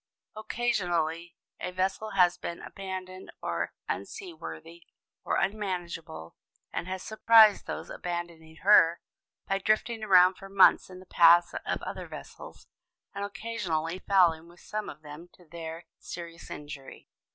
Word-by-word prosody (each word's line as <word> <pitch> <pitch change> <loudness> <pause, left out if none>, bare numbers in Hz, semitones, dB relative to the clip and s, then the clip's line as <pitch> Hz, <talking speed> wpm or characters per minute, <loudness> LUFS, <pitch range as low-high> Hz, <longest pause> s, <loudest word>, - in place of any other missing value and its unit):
Occasionally 175 -8 -1 0.2
a - - -3
vessel 190 +4 -2
has 180 -1 +5
been 170 - -6
abandoned 185 -1 -7
as - - -1 0.2
unseaworthy 320 - -7 0.4
or - - -1
unmanageable, 175 - -3 0.4
and - - -3
has 185 0 -5
surprised 220 -1 +5
those - - -5
abandoning 170 -2 -6
her 175 -4 +6 0.5
by 195 0 0
drifting 220 +2 0
around 185 -2 +6
for 195 - -10
months 195 -1 +5
in 185 0 -10
the 185 - -14
path 170 0 +6
of - - -2
other - - -6
vessels - - -11 0.5
and 200 - -4
occasionally 190 -6 -3
fouling 175 -5 +3
with 175 +1 -18
some 215 0 -5
of 155 - -11
them, 150 +4 -10
to 180 - -20
their 165 +1 -8
serious 170 -1 -9
injury. 145 -2 -9
180 Hz, 130 wpm, -28 LUFS, 165-200 Hz, 0.5 s, her